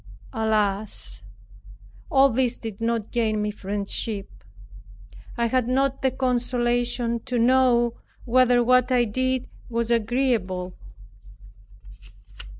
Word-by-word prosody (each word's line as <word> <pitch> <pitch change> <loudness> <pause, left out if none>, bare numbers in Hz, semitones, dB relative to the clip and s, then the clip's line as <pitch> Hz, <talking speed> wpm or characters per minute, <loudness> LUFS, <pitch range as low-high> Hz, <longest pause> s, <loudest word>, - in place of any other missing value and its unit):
Alas! 215 - 0 0.9
all 270 0 +5
this 245 0 0
did 225 -2 -8
not 230 -2 -1
gain 220 -3 0
me 210 0 -1
friendship. 200 +1 -3 1.1
I 235 - +1
had 245 0 +1
not 270 +1 0
the 265 - +3
consolation 245 -2 0
to 250 -1 -2
know 240 -1 +3 0.3
whether 245 0 +4
what 255 +1 +3
I 245 -1 +3
did 255 +3 -1 0.2
was 235 0 -1
agreeable. 220 -6 0
235 Hz, 100 wpm, -24 LUFS, 220-255 Hz, 1.1 s, all